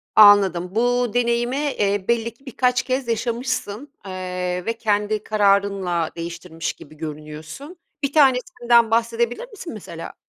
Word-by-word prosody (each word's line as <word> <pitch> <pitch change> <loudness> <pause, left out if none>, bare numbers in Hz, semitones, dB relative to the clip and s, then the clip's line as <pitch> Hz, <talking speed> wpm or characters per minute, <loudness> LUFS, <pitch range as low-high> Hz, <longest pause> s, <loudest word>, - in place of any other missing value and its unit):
Anladım, 195 -3 +6
bu 245 0 +1
deneyimi, 240 +1 +1
eee, 205 -9 0
belli 235 -1 +1
ki 270 +4 -28
birkaç 250 0 +1
kez 260 -1 -2
yaşamışsın, 235 +2 -2
eee, 180 -1 -3
ve 230 - 0
kendi 210 -1 0
kararınla 195 -5 +1
değiştirmiş 170 -1 -5
gibi 155 +1 -15
görünüyorsun. 155 - -8 0.3
Bir 280 0 0
tanesinden 245 -5 +3
bahsedebilir 235 - 0
misin, 385 - -8
mesela? 170 -6 -8
220 Hz, 125 wpm, -22 LUFS, 185-245 Hz, 0.3 s, Anladım